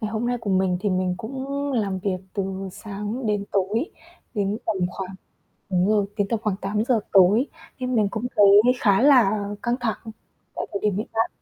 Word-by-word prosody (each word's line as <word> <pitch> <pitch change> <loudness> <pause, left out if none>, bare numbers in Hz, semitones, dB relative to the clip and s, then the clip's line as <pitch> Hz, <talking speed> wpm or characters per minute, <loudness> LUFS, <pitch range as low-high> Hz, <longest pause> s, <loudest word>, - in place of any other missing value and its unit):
Ngày 215 -2 -3
hôm 225 +2 -2
nay 245 0 0
của 210 - -3
mình 185 -1 +2
thì 205 - 0
mình 185 0 0
cũng 260 +6 -6 0.3
làm 200 -6 0
việc 190 0 -1 0.2
từ 195 -1 -3
sáng 210 +4 -5
đến 205 -1 0
tối, 205 - 0 0.4
đến 205 0 -1
tầm 220 -3 0
khoảng 190 0 -6 0.6
đúng 185 +1 +2
rồi, 210 -2 +2
đến 205 -2 +1
tầm 225 -2 0
khoảng 205 -3 0
8:00 215 +4 0
tối, 200 +8 +5 0.3
nên 255 0 -2
mình 210 -3 +3
cũng 225 +3 -3
thấy 205 - +7 0.3
khá 200 -4 +4
là 215 -8 +4
căng 240 +1 0
thẳng 225 -4 -1 0.6
tại - - -3
thời 200 - -2
điểm 210 -3 +1
hiện 215 - -2
tại. 225 +1 +1
210 Hz, 195 wpm, -24 LUFS, 195-225 Hz, 0.6 s, thấy